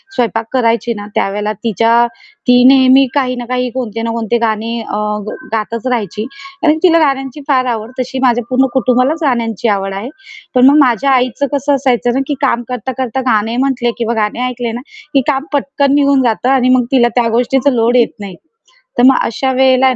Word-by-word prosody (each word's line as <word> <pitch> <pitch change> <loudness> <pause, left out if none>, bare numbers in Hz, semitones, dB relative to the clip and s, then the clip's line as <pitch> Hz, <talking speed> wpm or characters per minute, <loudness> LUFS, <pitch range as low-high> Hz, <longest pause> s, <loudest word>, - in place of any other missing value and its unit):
स्वयंपाक 225 - -1
करायची 235 -1 +1
ना, 205 - -7
त्यावेळेला 210 +2 -1
तिच्या 230 +1 +2 0.4
ती 245 0 +5
नेहमी 265 0 +5
काही 260 -3 0
ना 245 -1 -6
काही, 250 +1 -2
कोणते 230 -3 -4
ना 230 0 -2
कोणते 230 0 -1
गाणे 220 0 -1
अ, 210 - -5 0.6
गातच 225 +2 -3
राहायची 220 -3 -2 0.4
आणि 305 -1 +4
तिला 335 -2 +5
गाण्यांची 270 -2 -1
फार 260 -3 +2
आवड. 220 +1 -6
तशी 260 +1 -3
माझ्या 245 -1 +2
पूर्ण 260 +1 +2
कुटुंबालाच 255 +4 +1
गाण्यांची 235 -5 -1
आवड 195 -1 -1
आहे. 200 +6 -5 0.5
पण 250 +1 +6
मग 290 - +4
माझ्या 270 0 +2
आईचं 255 +2 +1
कसं 285 0 +1
असायचं 250 -3 0
ना, 270 - +1
की 295 - -1
काम 245 -3 +1
करता-करता 255 +1 -3
गाणे 220 +2 0
म्हटले 255 -2 0
किंवा 235 0 -1
गाणे 215 +4 -2
ऐकले 245 -2 -4
ना, 235 +2 -6 0.3
की 275 - +4
काम 275 0 -1
पटकन 280 0 0
निघून 280 -2 +3
जातं 240 +1 0
आणि 260 -2 +2
मग 250 -1 +1
तिला 250 -3 +4
त्या 240 -2 +2
गोष्टीचा 250 +4 +1
लोड 235 -1 +1
येत 240 - +2
नाही. 200 -3 -8 0.6
तर 245 - +3
मग 265 0 +6
अशा 265 +4 -1
वेळेला 260 0 +3
आहे 260 -1 +3
250 Hz, 190 wpm, -14 LUFS, 230-265 Hz, 0.6 s, पण